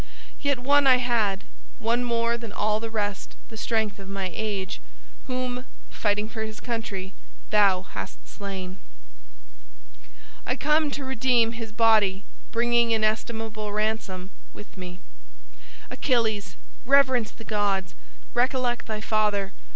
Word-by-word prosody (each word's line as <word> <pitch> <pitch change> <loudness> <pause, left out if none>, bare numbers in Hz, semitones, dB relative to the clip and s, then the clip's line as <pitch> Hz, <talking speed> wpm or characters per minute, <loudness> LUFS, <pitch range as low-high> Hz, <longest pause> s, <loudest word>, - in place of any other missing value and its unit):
Yet 280 -2 +2
one 280 +3 +4
I 255 -1 +8
had, 225 -5 +1 0.3
one 235 +2 +1
more 235 -1 +1
than 230 -2 -6
all 215 0 +1
the 225 0 -4
rest 205 -3 -3
the 225 - -9
strength 220 -2 -1
of 195 -1 -9
my 195 -2 -3
age, 200 -1 -3 0.5
whom, 255 -1 -2 0.3
fighting 210 0 0
for 220 0 -5
his 220 0 -4
country, 215 -5 -4 0.4
thou 200 -3 +5
hast - - -8
slain. 190 -2 -6 1.7
I 250 - -1
come 300 +2 +3
to 275 -1 -4
redeem 245 -2 +3
his 230 -2 -6
body, 215 -4 +4 0.3
bringing 235 0 +3
inestimable 220 -1 0
ransom 210 -3 -2 0.2
with 210 - -12
me. 180 -1 -7 0.9
Achilles! 220 -7 +1 0.3
reverence 260 -4 +4
the 225 - -12
gods! 200 -4 0 0.4
recollect 245 0 +1
thy 215 -1 -3
father! 210 -2 +1
220 Hz, 125 wpm, -26 LUFS, 205-240 Hz, 1.7 s, I